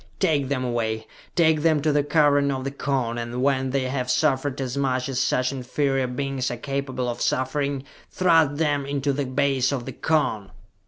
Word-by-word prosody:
"Take 150 Hz, -7 st, +2 dB
them 130 Hz, -1 st, -1 dB
away! 110 Hz, -2 st, -2 dB, 0.3 s
Take 160 Hz, -3 st, +3 dB
them 160 Hz, -1 st, +3 dB
to 155 Hz, -, +3 dB
the 145 Hz, 0 st, +2 dB
Cavern 145 Hz, -1 st, +3 dB
of 135 Hz, -1 st, -2 dB
the 135 Hz, -, -3 dB
Cone, 130 Hz, -5 st, -1 dB
and 120 Hz, +2 st, -3 dB
when 135 Hz, -1 st, +1 dB
they 135 Hz, 0 st, 0 dB
have 130 Hz, -1 st, -2 dB
suffered 140 Hz, -1 st, +1 dB
as 130 Hz, -1 st, -3 dB
much 130 Hz, -2 st, 0 dB
as 130 Hz, -2 st, -2 dB
such 130 Hz, 0 st, +1 dB
inferior 135 Hz, 0 st, -1 dB
beings 130 Hz, 0 st, -2 dB
are 120 Hz, -, -4 dB
capable 135 Hz, -1 st, -3 dB
of 120 Hz, -, -4 dB
suffering, 140 Hz, +1 st, 0 dB, 0.3 s
thrust 165 Hz, -5 st, +3 dB
them 145 Hz, -3 st, +1 dB
into 140 Hz, 0 st, 0 dB
the 140 Hz, -1 st, -2 dB
base 135 Hz, 0 st, +1 dB
of 130 Hz, -4 st, -3 dB
the -, -, -6 dB
Cone!" 130 Hz, -11 st, 0 dB
135 Hz, 190 wpm, -24 LUFS, 130-145 Hz, 0.3 s, Take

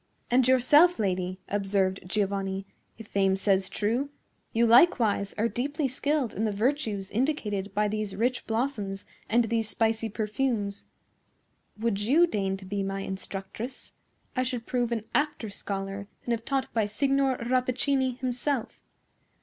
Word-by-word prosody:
"And 250 Hz, 0 st, +4 dB
yourself, 290 Hz, +7 st, +6 dB
lady," 185 Hz, -3 st, -1 dB
observed 195 Hz, -1 st, 0 dB
Giovanni, 195 Hz, -1 st, -1 dB, 0.3 s
"if 225 Hz, -, -9 dB
fame 195 Hz, -1 st, +2 dB
says 195 Hz, -1 st, +2 dB
true,—you 235 Hz, 0 st, -2 dB
likewise 230 Hz, -, +4 dB
are 220 Hz, +2 st, +1 dB
deeply 285 Hz, +5 st, -1 dB
skilled 275 Hz, 0 st, -1 dB
in 215 Hz, -, -2 dB
the 215 Hz, -, +1 dB
virtues 215 Hz, -3 st, -1 dB
indicated 210 Hz, -6 st, -1 dB
by 210 Hz, 0 st, +2 dB
these 210 Hz, -1 st, -3 dB
rich 245 Hz, +4 st, 0 dB
blossoms 220 Hz, -5 st, -2 dB, 0.2 s
and 235 Hz, +2 st, +4 dB
these 225 Hz, -1 st, -1 dB
spicy 225 Hz, +1 st, 0 dB
perfumes. 210 Hz, -1 st, -1 dB, 0.9 s
Would 215 Hz, -2 st, 0 dB
you 285 Hz, +11 st, +5 dB
deign 195 Hz, -, -1 dB
to 190 Hz, -, -11 dB
be 200 Hz, +1 st, -2 dB
my 195 Hz, 0 st, -2 dB
instructress, 195 Hz, +6 st, -6 dB, 0.4 s
I 255 Hz, -, +2 dB
should 250 Hz, -2 st, -2 dB
prove 245 Hz, -2 st, 0 dB
an 225 Hz, -2 st, -2 dB
apter 295 Hz, -8 st, 0 dB
scholar 195 Hz, 0 st, -5 dB, 0.2 s
than 240 Hz, -, +1 dB
if 230 Hz, -1 st, -2 dB
taught 270 Hz, -1 st, -1 dB
by 220 Hz, -3 st, +2 dB
Signor 270 Hz, +3 st, +1 dB
Rappaccini 255 Hz, +1 st, +1 dB
himself." 255 Hz, 0 st, -2 dB
225 Hz, 140 wpm, -28 LUFS, 200-255 Hz, 0.9 s, yourself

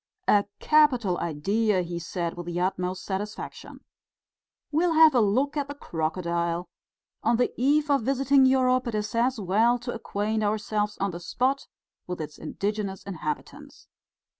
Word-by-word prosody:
"A 205 Hz, -1 st, +4 dB
capital 250 Hz, -, +3 dB
idea!" 190 Hz, +5 st, 0 dB
he 170 Hz, 0 st, -5 dB
said, 170 Hz, 0 st, -3 dB
with 175 Hz, -1 st, -7 dB
the 175 Hz, 0 st, -2 dB
utmost 185 Hz, 0 st, -2 dB
satisfaction. 205 Hz, +2 st, -6 dB, 0.9 s
"We'll 330 Hz, +3 st, +2 dB
have 320 Hz, -1 st, +7 dB
a 250 Hz, -, +4 dB
look 255 Hz, +8 st, +1 dB
at 285 Hz, -2 st, -1 dB
the 285 Hz, -, -7 dB
crocodile! 170 Hz, -, -2 dB, 0.5 s
On 230 Hz, +1 st, +2 dB
the 245 Hz, -, +1 dB
eve 290 Hz, +4 st, +2 dB
of 280 Hz, -, +3 dB
visiting 270 Hz, +2 st, +3 dB
Europe 255 Hz, -1 st, +3 dB
it 230 Hz, -, -2 dB
is 210 Hz, +2 st, -2 dB
as 240 Hz, +1 st, +1 dB
well 215 Hz, +6 st, +3 dB
to 240 Hz, 0 st, -5 dB
acquaint 215 Hz, -1 st, -2 dB
ourselves 210 Hz, 0 st, -1 dB
on 200 Hz, 0 st, -1 dB
the 170 Hz, -, -7 dB
spot 260 Hz, +9 st, -1 dB, 0.4 s
with 180 Hz, -1 st, -4 dB
its 150 Hz, -2 st, -7 dB
indigenous 200 Hz, +3 st, -3 dB
inhabitants." 200 Hz, -, -6 dB
210 Hz, 150 wpm, -26 LUFS, 180-255 Hz, 0.9 s, have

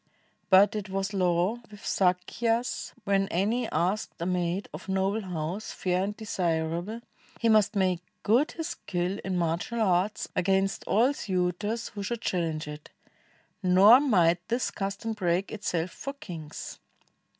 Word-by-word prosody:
But 200 Hz, +3 st, +6 dB
it 210 Hz, -2 st, -4 dB
was 195 Hz, +1 st, -2 dB
law 180 Hz, +3 st, +1 dB
With 205 Hz, -1 st, -13 dB
Sakyas, 220 Hz, +6 st, 0 dB
w^hen 195 Hz, -1 st, +2 dB
any 220 Hz, +7 st, 0 dB
asked 190 Hz, +5 st, -1 dB
a 170 Hz, -, -2 dB
maid 180 Hz, +1 st, -1 dB
Of -, -, -8 dB
noble 195 Hz, +3 st, +1 dB
house, 180 Hz, +2 st, -4 dB
fair 185 Hz, 0 st, 0 dB
and 210 Hz, +1 st, -3 dB
desirable, 175 Hz, +1 st, -2 dB, 0.4 s
He 230 Hz, -, +2 dB
must 215 Hz, 0 st, +4 dB
make 185 Hz, -3 st, +2 dB, 0.2 s
good 250 Hz, +9 st, +3 dB
his 325 Hz, 0 st, -4 dB
skill 180 Hz, -, -3 dB
in 190 Hz, -1 st, -1 dB
martial 170 Hz, +7 st, -1 dB
arts 195 Hz, 0 st, +1 dB
Against 195 Hz, +1 st, +1 dB
all 245 Hz, +7 st, +3 dB
suitors 195 Hz, +2 st, -2 dB
who 205 Hz, -, -7 dB
should 230 Hz, +3 st, -3 dB
challenge 160 Hz, -4 st, -1 dB
it; 150 Hz, 0 st, -8 dB, 0.7 s
Nor 195 Hz, +6 st, +7 dB
might 180 Hz, -, +3 dB
this 240 Hz, +2 st, 0 dB
custom 200 Hz, +3 st, -3 dB
break 185 Hz, -2 st, 0 dB
itself 180 Hz, -5 st, -2 dB
for 275 Hz, -, -6 dB
kings. 170 Hz, -, -8 dB
195 Hz, 140 wpm, -28 LUFS, 180-215 Hz, 0.7 s, Nor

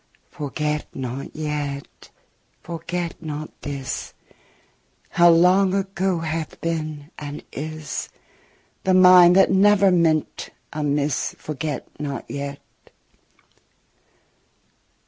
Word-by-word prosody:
Forget 150 Hz, +1 st, -3 dB
not 130 Hz, +1 st, -5 dB
yet, 150 Hz, -2 st, -5 dB, 0.5 s
forget 170 Hz, +1 st, -4 dB
not 155 Hz, -1 st, -5 dB
this, 135 Hz, -2 st, -5 dB, 0.9 s
How 175 Hz, 0 st, +5 dB
long 185 Hz, +3 st, +5 dB
ago 195 Hz, -2 st, 0 dB
hath 160 Hz, -1 st, -4 dB
been 155 Hz, -2 st, -4 dB
and 145 Hz, 0 st, -7 dB
is 155 Hz, +1 st, -5 dB, 0.7 s
The 190 Hz, -1 st, +3 dB
mind 180 Hz, -1 st, +8 dB
that 195 Hz, -, +5 dB
never 195 Hz, 0 st, +5 dB
meant 165 Hz, -3 st, +1 dB, 0.2 s
amiss, 145 Hz, -2 st, -1 dB
Forget 155 Hz, 0 st, -4 dB
not 140 Hz, -2 st, -4 dB
yet. 140 Hz, 0 st, -5 dB
155 Hz, 90 wpm, -23 LUFS, 145-180 Hz, 0.9 s, mind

